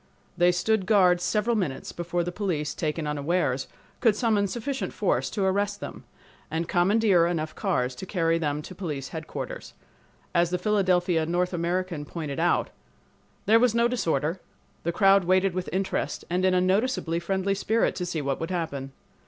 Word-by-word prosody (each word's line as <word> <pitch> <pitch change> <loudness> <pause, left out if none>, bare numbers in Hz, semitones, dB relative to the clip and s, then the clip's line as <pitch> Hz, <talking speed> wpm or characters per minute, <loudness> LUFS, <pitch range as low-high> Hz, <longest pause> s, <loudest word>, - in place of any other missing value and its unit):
They 175 0 +4
stood 190 +2 0
guard 180 -5 +4
several 215 +5 +1
minutes 150 -11 -2
before 175 0 -2
the 175 - -3
police, 175 -7 -2
taken 155 0 -2
unawares, 145 -2 0 0.3
could 225 -4 +4
summon 210 -3 +2
sufficient 260 +6 -3
force - - 0
to 200 - -2
arrest 200 +1 0
them, - - -8 0.4
and 165 +1 -2
commandeer 185 -1 +3
enough 155 -3 -2
cars 130 - -1
to 190 - -7
carry 165 -3 +1
them 150 -1 -2
to 185 - -9
police 150 -8 -5
headquarters. 160 -1 -6 0.6
As 170 -1 +3
the 180 - 0
Philadelphia 180 -5 +2
North 180 +2 0
American 175 -2 -2
pointed 155 -2 -5
out: 175 +1 +1 0.7
"There 225 +2 +6
was 240 -1 +3
no 235 0 +4
disorder. 170 - -1 0.4
The 170 - -1
crowd 195 +1 +4
waited 185 +1 +3
with 185 0 -3
interest 190 +1 -2
and 180 +1 +1
in 185 -1 +3
a 180 - +3
noticeably 185 -3 +1
friendly 190 +3 0
spirit 220 +3 +1
to 180 - -2
see 160 -4 -2
what 135 0 -1
would 165 - -3
happen. 145 -7 -3
180 Hz, 170 wpm, -26 LUFS, 165-200 Hz, 0.7 s, There